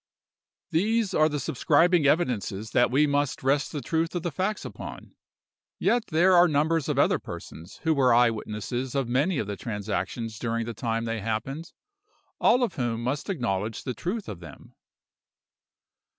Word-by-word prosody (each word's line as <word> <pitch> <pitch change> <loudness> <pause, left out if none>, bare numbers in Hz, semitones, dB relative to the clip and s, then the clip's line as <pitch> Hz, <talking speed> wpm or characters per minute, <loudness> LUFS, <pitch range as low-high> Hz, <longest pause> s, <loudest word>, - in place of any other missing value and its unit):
"These 215 +5 +1
are 155 0 +4
the 145 -1 -2
subscribing 160 +4 +3
evidences 110 - 0
that 120 - +3
we 140 +5 +3
must 145 -2 0
rest 140 +2 +1
the 145 - -4
truth 165 +5 -1
of 175 - -2
the 175 - -2
facts 190 +8 -2
upon; - - -9 0.6
yet 240 -1 +1
there 175 +4 +4
are 175 0 +7
numbers 155 0 +1
of - - 0
other - - +3
persons 85 +2 -9
who 160 - +3
were 135 -4 +3
eye 120 0 +5
witnesses 115 +4 -4
of 135 -3 0
many 140 +8 +1
of 110 - -1
the 100 0 -4
transactions 110 +1 -4
during 115 -1 -1
the 115 - -5
time 115 +1 -2
they 115 -1 -2
happened, 115 +9 -4 0.7
all 250 - +4
of 225 -7 0
whom 120 -3 -1
must 135 - -2
acknowledge 110 - -2
the 130 - -3
truth 190 - -4
of 95 - -6
them. 85 -4 -13
135 Hz, 165 wpm, -26 LUFS, 115-165 Hz, 0.7 s, are